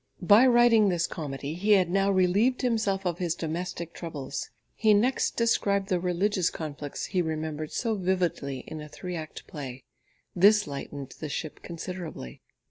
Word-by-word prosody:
By 210 +8 +7
writing 240 -4 +5
this 175 -1 +1
comedy, 145 -2 -5
he 200 +5 +3
had 185 -3 +4
now 195 +3 +2
relieved 200 +8 +2
himself 215 -6 0
of 175 -1 -1
his 175 -3 0
domestic 170 +1 -4
troubles. 145 -5 -5 0.2
He 215 -2 +4
next 245 +6 +1
described 200 -4 +1
the 180 - +2
religious 185 +1 +1
conflicts 145 -2 -5
he 185 -3 0
remembered 155 -1 -3
so 230 -2 -1
vividly 180 -9 -1
in 155 -1 -7
a 150 - -9
three 180 +4 -6
act 155 -2 -7
play. 135 -4 -8 0.5
This 205 +3 +6
lightened 140 -1 -7
the 155 - -5
ship 155 +2 -5
considerably. 170 - -7
180 Hz, 155 wpm, -27 LUFS, 155-200 Hz, 0.5 s, By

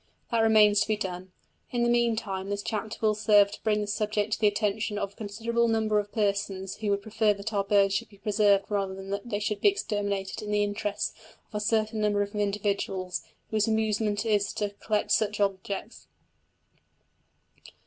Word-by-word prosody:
That 230 - +2
remains 215 -2 +5
to - - +1
be 215 -1 +1
done; 185 -2 -5 0.4
in 240 -1 0
the - - +3
meantime 225 -5 0
this 200 0 -2
chapter 215 0 -3
will 215 -1 +3
serve 210 -1 +4
to - - -9
bring 210 -1 +1
the - - -1
subject 210 0 -1
to - - -1
the 215 - +4
attention 210 +1 0
of 200 -1 -3
a - - -30
considerable 230 +3 -1
number 220 -2 +2
of 205 0 -5
persons 200 -3 -1
who 210 -1 -2
would 200 0 0
prefer 220 -1 +1
that 200 +3 -5
our 200 -1 +1
birds 200 -1 +3
should 195 - -2
be 200 - -18
preserved 205 -1 +3
rather 195 -2 -1
than 195 0 -8
that 200 +4 -4
they 205 - -1
should 210 0 -2
be - - +7
exterminated 205 - -2
in 210 - -6
the 210 0 +2
interests 205 0 -2 0.4
of - - -30
a 210 - -1
certain 220 0 0
number 205 -1 +2
of 205 - -8
individuals 200 -3 -1 0.3
whose 215 0 +2
amusement 220 -1 0
it 225 - 0
is 205 -1 +1
to 205 -1 -2
collect 210 -1 0
such 210 -1 +2
objects. 200 +2 -3
210 Hz, 195 wpm, -28 LUFS, 200-220 Hz, 0.4 s, be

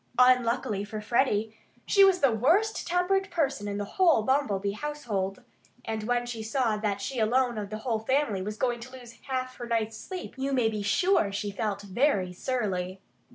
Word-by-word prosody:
Unluckily 250 -4 +3
for 215 +1 -6
Freddie, 220 -1 +1 0.3
she 395 - +5
was 385 -2 +5
the 275 -3 +5
worst 335 - +2
tempered 375 +3 +1
person 275 - -1
in 200 0 -3
the 205 - -2
whole 330 - +3
Bumblebee 210 -7 +1
household. 210 -7 -3 0.4
And 220 -1 -3
when 240 +1 0
she 235 -2 -5
saw 225 0 0
that 205 -2 -1
she 250 +5 -4
alone 240 +1 +2
of 205 -1 -5
the 215 - -4
whole 230 -3 0
family 230 -4 0
was 210 +3 -5
going 240 -1 0
to 250 +2 -11
lose 245 -3 -11 0.2
half 255 -1 -3
her 240 - -6
night's 225 -1 -1
sleep 370 -1 -7
you 275 +1 -1
may 245 -4 +3
be 215 -1 -3
sure 210 - +2
she 200 +1 -3
felt 205 -1 -3
very 200 -3 +1
surly. 190 -4 -2
235 Hz, 185 wpm, -28 LUFS, 210-265 Hz, 0.4 s, she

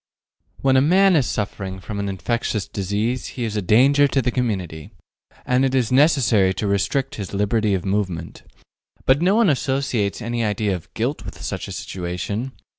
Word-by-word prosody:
When 135 -1 +4
a - - +5
man 185 +5 +4
is 140 -6 +2
suffering 95 -2 -4
from 100 +2 -6
an 100 0 -2
infectious 105 +1 -2
disease 105 +6 -2
he 125 - -2
is 110 -2 -3
a 105 - 0
danger 135 +9 +4
to 140 - 0
the 125 -1 0
community, 95 - -3 0.6
and 125 +1 +2
it 135 0 +1
is 125 -3 +1
necessary 125 - +4
to 105 - -3
restrict 130 +8 0
his 100 0 -6
liberty 105 0 +1
of 95 - -4
movement. 95 -4 -2 0.6
But 135 +3 +3
no 185 +4 +3
one 230 -2 +4
associates 130 -7 -1
any 120 0 -2
idea 105 -1 0
of 85 - -10
guilt - - -2
with - - -9
such - - -4
a - - -8
situation. 95 +8 -4
110 Hz, 180 wpm, -22 LUFS, 100-130 Hz, 0.6 s, a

